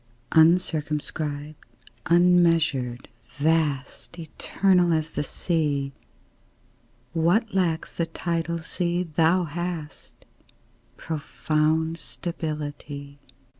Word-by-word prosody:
UNCIRCUMSCRIBED, 155 -2 +1 0.5
unmeasured, 165 -8 +3 0.3
vast, 150 +1 0
Eternal 175 +2 +1
as 160 0 -1
the 150 - -2
Sea; 145 -3 -1 1.2
What 175 +8 +2
lacks 170 -4 0
the 170 - -1
tidal 170 0 -2
sea 175 +1 -1
thou 165 +2 +2
hast 170 -1 -6 0.7
Profound 160 +1 -1
stability. 145 -4 -5
160 Hz, 70 wpm, -25 LUFS, 150-170 Hz, 1.2 s, unmeasured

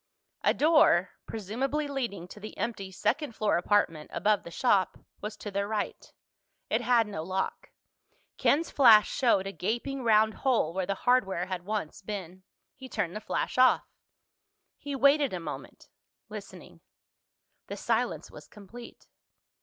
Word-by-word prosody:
A - - +3
door, 300 - +4 0.2
presumably 260 +8 -2
leading 235 -11 -4
to 210 - -11
the 215 +1 -9
empty 200 -5 -4
second 235 - -1
floor 215 -1 +1
apartment 175 -5 +1
above 210 -1 +1
the - - -10
shop, 195 +1 +1 0.2
was 210 +1 -6
to 205 - -7
their 200 +1 -1
right. 215 -1 -4 0.6
It - - +2
had 240 -2 +3
no 200 -6 -5
lock. 185 +3 -3 0.7
Ken's 325 +4 +2
flash 225 -6 +7
showed 230 -7 +2
a 195 - -4
gaping 240 +8 -3
round 220 -1 +4
hole 235 - +2
where 185 0 -2
the 200 - -1
hardware 195 -8 +2
had 180 -1 -5
once 205 -6 -4
been. 190 -3 -7 0.3
He 260 0 -11
turned 175 -4 -2
the 215 - -5
flash - - -2
off. 255 - +5 0.9
He 285 -1 -6
waited 280 -1 +4
a 180 - -2
moment, 165 - -8 0.4
listening. - - -10 0.9
The - - -6
silence - - -1
was - - -12
complete. 225 +4 -13
215 Hz, 145 wpm, -29 LUFS, 190-255 Hz, 0.9 s, flash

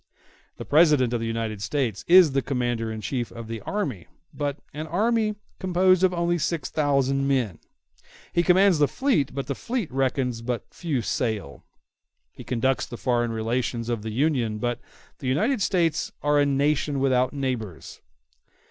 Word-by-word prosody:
The - - -7
President 150 -6 +4
of 120 - 0
the 115 - -3
United 115 -2 -3
States 120 -5 -2
is 180 -3 +7
the 135 0 +1
commander 120 -4 -2
in 110 0 -5
chief 120 +3 -3
of 115 -1 -8
the 115 -1 -5
army, 140 - -3 0.3
but 145 0 -2
of - - -32
an 155 +2 -5
army 215 +5 +1 0.2
composed 185 0 +3
of 185 - +5
only 175 -1 0
six 155 -3 -2
thousand 140 -2 +1
men; 125 -10 0 0.7
he 170 - +3
commands 180 0 +4
the 145 - +5
fleet, 170 - 0
but 140 - -3
the 140 - -2
fleet 230 - -3
reckons 130 -2 -1
but 120 0 -4
few 150 -9 -2
sail; 105 - -3 0.7
he - - -11
conducts 130 +2 0
the 120 - -8
foreign 120 -2 0
relations 115 +1 -2
of 115 -3 -1
the 110 - -5
Union, 120 -3 0
but 120 +2 -2 0.4
the 135 - -5
United 210 - +1
States 170 -5 +1
are 145 0 +3
a 145 - +3
nation 140 0 +1
without 130 -1 +2
neighbors. 125 - -4
135 Hz, 165 wpm, -25 LUFS, 120-160 Hz, 0.7 s, is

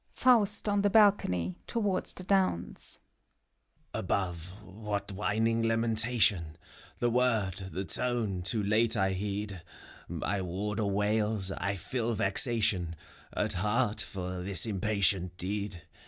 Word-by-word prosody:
FAUST 220 -5 +3
{on 205 -1 +2
the 205 - +3
balcony, 140 - +3
towards 205 -5 -1
the 185 - -8
downs). 185 - 0 0.9
Above, 90 -4 -2 0.2
what 105 0 -5
whining 110 +3 0
lamentation 115 -6 +2
T 80 - -25 0.4
The 120 -1 +1
word, 115 -6 +2 0.2
the 95 +4 -4
tone, 115 -5 0
too 105 +4 0
late 110 +3 +2
I 95 -1 +2
heed. 100 0 -4 0.5
My 100 -1 -2
warder 100 +4 -2
wails: 105 0 0
I 100 +1 -2
feel 115 +4 -2
vexation 100 -4 +2 0.4
At 105 0 -1
heart, 105 +4 0
for 90 -1 -4
this 95 +2 +3
impatient 100 -3 0
deed. 100 -1 -4
105 Hz, 120 wpm, -30 LUFS, 95-115 Hz, 0.9 s, FAUST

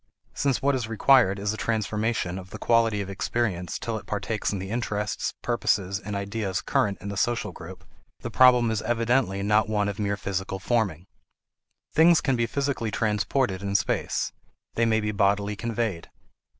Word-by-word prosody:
Since 135 -3 0
what 140 +1 +3
is 125 -4 -2
required 115 -3 +4
is 100 +1 -1
a - - -6
transformation 110 -4 -1
of 95 0 -11
the - - -8
quality 115 -3 +2
of 100 - -6
experience 95 -3 -2
till - - -3
it - - -17
partakes - - -2
in 100 - -2
the 95 +1 -6
interests, 105 -3 -2
purposes, 95 -1 0
and 105 0 -6
ideas 100 -1 -2
current 100 -2 0
in 100 - -6
the 100 - -4
social 120 +3 0
group, - - -11 0.4
the - - -5
problem 125 -2 +5
is 110 -1 -1
evidently 115 -4 +1
not 105 +1 +2
one 105 -1 +1
of 105 +1 -4
mere 100 -1 -1
physical 95 -1 -3
forming. 95 -5 -1 0.9
Things 165 +1 +6
can 135 -3 0
be 120 -1 0
physically 140 -5 -1
transported 105 0 0
in 100 0 -3
space; - - 0 0.4
they 115 0 +2
may 110 -1 +2
be 105 0 -1
bodily 100 0 +1
conveyed. 110 -5 -3
105 Hz, 175 wpm, -26 LUFS, 100-115 Hz, 0.9 s, Things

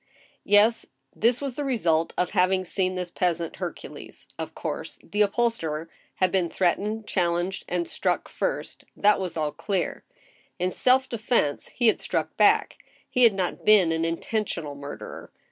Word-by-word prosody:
Yes 210 +3 +4
— 135 - -41
this 240 +2 +4
was 275 -2 -3
the 290 - -3
result 170 - +1
of 180 -1 0
having 185 +1 +2
seen 185 +1 0
this 180 -1 -4
peasant 170 -2 -1
Hercules: - - -8
of - - -5
course, - - -5
the 205 - -2
upholsterer 195 -8 0 0.2
had 185 -1 +2
been 185 -3 +1
threatened, 210 +5 0
challenged, 175 0 -1
and 175 -1 -1
struck - - -1
first; - - -3
that 210 0 +4
was 185 -3 -4
all 155 -1 0
clear. 190 0 -2 0.5
In 180 +1 0
self 260 +4 +3
defense 225 - 0
he 245 - -2
had 220 - +4
struck - - -2
back; - - +3 0.3
he 250 - -1
had 220 -4 +5
not 185 -2 -2
been 200 -6 +6
an 160 0 0
intentional 165 -2 -2
murderer. 140 0 -8
185 Hz, 160 wpm, -26 LUFS, 170-220 Hz, 0.5 s, been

